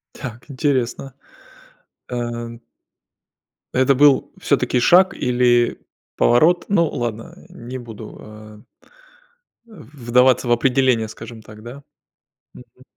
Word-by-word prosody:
Так, 120 -3 -9
интересно. 135 -1 -2 1.0
Э 120 -1 -5 1.2
Это 130 +2 +3
был 145 0 +4
всё-таки 125 - 0
шаг 185 +8 +5
или 120 -1 +1 0.4
поворот? 160 +9 +3
Ну 170 -5 +2
ладно, 115 -3 -5
не 125 +2 -9
буду, 115 -3 -10
э 110 0 -13 1.1
э, - - -21 0.2
вдаваться 125 -1 +2
в - - 0
определение, 125 -1 +2
скажем 115 +1 -11
так, 110 0 -14
да. 130 +4 -10 0.7
Мгм. 125 +1 -17
120 Hz, 100 wpm, -20 LUFS, 115-130 Hz, 1.2 s, шаг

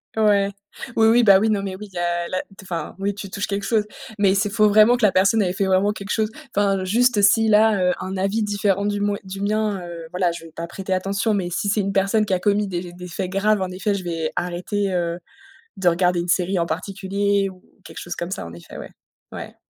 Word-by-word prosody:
Ouais. 205 -2 +3 0.5
Oui, 220 0 +5
oui, 235 +2 +5
bah 195 -3 +7
oui. 220 +1 +1
Non, 205 -2 +1
mais 190 -1 -4
oui, 210 +1 -9
il - - -18
y - - -5
a 175 0 -1
la 185 - -1
t - - -19 0.2
enfin, 170 -4 -5
oui 200 +1 -1
tu 200 0 -8
touches 200 +2 -3
quelque 200 -1 -3
chose, 220 -3 +2 0.4
mais 195 -1 +4
c'est 205 +1 +1
faut 215 0 +3
vraiment 215 +4 +6
que 240 - +2
la 200 - +4
personne 195 +4 +3
elle 190 - +1
ait - - -2
fait 195 +1 0
vraiment 190 +2 +2
quelque 205 -1 -6
chose 215 -1 +1 0.3
enfin, 195 -2 +2
juste 235 +2 +3
si 220 +2 +5
là, 215 0 +5
heu, - - 0
un 190 +1 -5
avis 195 +4 0
différent 200 -1 0
du 205 0 -1
moin 205 0 0
du 195 0 -7
mien, 210 -1 0
heu, 170 -1 -8
voilà 180 -1 +1
je 170 -1 -8
vais 165 - -13
pas 165 +1 -6
prêter 190 +2 -4
attention, 200 +4 0
mais 190 -4 -1
si 175 - -2
c'est 205 +1 +2
une 195 0 -2
personne 200 +3 +2
qui 195 - -1
a 185 - +1
commis 205 +2 +1
des 175 -1 -5
des 180 0 -9
faits 180 +1 -4
graves 200 +1 +2
en 185 - -1
effet 195 +3 -1
je 195 - -5
vais 165 -2 -3
arrêter, 185 +3 -2
heu, 170 -1 -1 0.6
de 185 -2 +3
regarder 175 0 +2
une 175 - -5
série 180 +1 +1
en 170 - 0
particulier 195 +3 -1
ou 185 -1 -13 0.2
quelque - - -10
chose 175 - -5
comme 170 +1 -4
ça 185 - -4
en 85 - -9
effet, 85 0 -12
ouais, - - -8 0.4
ouais, - - -8
195 Hz, 255 wpm, -22 LUFS, 180-205 Hz, 0.6 s, bah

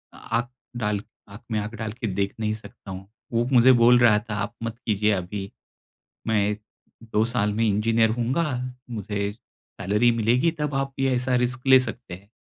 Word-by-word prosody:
आँख 120 +3 -2 0.3
डाल 105 -3 0 0.3
आँख 100 +3 -11
में 110 - +1
आँख 105 +2 -5
डाल 110 -1 -4
के 115 - -1
देख 100 0 -1
नहीं 110 -1 0
सकता 105 -2 -10
हूँ। 95 +1 -8 0.3
वो 115 +1 +2
मुझे 125 +1 +7
बोल 120 0 +6
रहा 115 -3 +5
था, 105 0 -6
"आप 105 +2 -3
मत 115 0 -4
कीजिये 105 -1 +2
अभी। 95 +1 -4 0.8
मैं 105 -2 +2 0.5
2 110 -1 +1
साल 115 -3 0
में 110 +2 0
इंजीनियर 110 +2 +2
हूँगा, 125 +8 0 0.4
मुझे 105 -3 -3
सैलरी 105 +1 -1
मिलेगी, 120 +8 +2
तब 150 -3 -3
आप 135 0 -1
ये 135 -1 +2
ऐसा 125 +1 0
रिस्क 125 +1 0
ले 130 0 +8
सकते 125 -5 -5
हैं।" 100 +3 -12
110 Hz, 180 wpm, -24 LUFS, 105-120 Hz, 0.8 s, ले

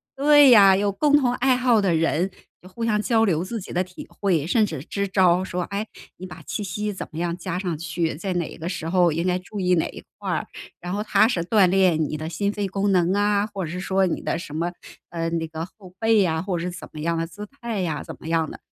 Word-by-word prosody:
对 290 0 +6
呀， 200 -4 +8
有 200 +1 +1
共 290 +8 +3
同 250 -4 +1
爱 260 +1 +3
好 250 -3 +3
的 185 -4 +2
人 165 +3 +1 0.3
就 180 - -14
互 230 +5 -6
相 215 -2 +1
交 225 0 +2
流 170 -5 +1
自 225 +5 -4
己 - - -9
的 180 - +1
体 180 0 -11
会， 170 -7 0
甚 220 +4 +3
至 155 -9 -6
支 200 +4 -3
招 185 -2 +3
儿， - - -3
说： 180 -1 -3
“哎， 200 +2 -2 0.3
你 185 - -8
把 - - -11
气 210 - -4
息 210 +2 -3
怎 190 - -6
么 160 - -6
样 170 0 -2
加 180 0 -4
上 180 -4 -3
去， 165 0 -2
在 185 +5 -3
哪 175 -2 -3
个 165 - -6
时 165 -3 -4
候 175 -1 +3
应 165 +3 -1
该 180 0 +2
注 200 +3 -8
意 180 -1 +2
哪 160 - +1
一 - - -10 0.2
块 - - -3
儿， - - -2 0.3
然 180 - -6
后 205 +1 -2
它 215 0 +4
是 185 -8 -1
锻 195 0 +4
炼 180 -3 +3
你 155 +1 -3
的 155 +1 -5
心 200 +5 -1
肺 205 -1 -2
功 195 +1 0
能 180 -1 +3
啊， 205 0 +2
或 200 -3 -5
者 - - -6
是 180 - -4
说 190 0 +1
你 175 - -2
的 - - -2
什 150 -4 -8
么 170 +2 -1 0.4
呃， 165 -1 -2
那 165 -1 -2
个 160 0 -5
后 185 0 -16
背 220 -3 +4
啊， 160 -2 0
或 185 0 -2
者 170 - -3
是 180 - -3
怎 175 - -9
么 150 - -7
样 170 +2 0
的 165 0 -2
姿 190 +5 -9
态 235 -5 -5
呀， 160 -4 -2
怎 - - -9
么 - - -10
样 165 -1 +1
的。” - - -10
185 Hz, 290 characters per minute, -23 LUFS, 170-205 Hz, 0.4 s, 呀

